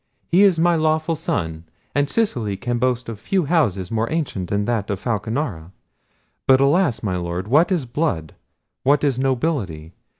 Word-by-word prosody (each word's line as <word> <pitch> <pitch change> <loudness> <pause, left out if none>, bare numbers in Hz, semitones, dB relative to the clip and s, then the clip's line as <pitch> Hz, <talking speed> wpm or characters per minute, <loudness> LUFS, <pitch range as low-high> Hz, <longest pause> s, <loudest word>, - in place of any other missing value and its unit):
He 180 +3 +4
is 195 -4 +5
my 175 +1 +3
lawful 155 +1 +1
son, 85 - -3 0.3
and 145 0 +1
Sicily 120 - -1
can 120 +2 -2
boast 125 0 0
of 115 -3 -6
few 185 - 0
houses 110 - +1
more 115 0 -1
ancient 140 - -2
than 100 0 0
that 115 -4 -1
of 100 -2 -2
Falconara. 110 - -3 0.7
But 130 0 +6
alas! 140 -2 +2
my 95 -4 -1
Lord, 90 +2 -4
what 150 - +4
is 170 -8 +1
blood! 120 - -2 0.5
what 145 +2 +3
is 135 -4 +1
nobility! 120 - -1
125 Hz, 165 wpm, -21 LUFS, 100-155 Hz, 0.7 s, But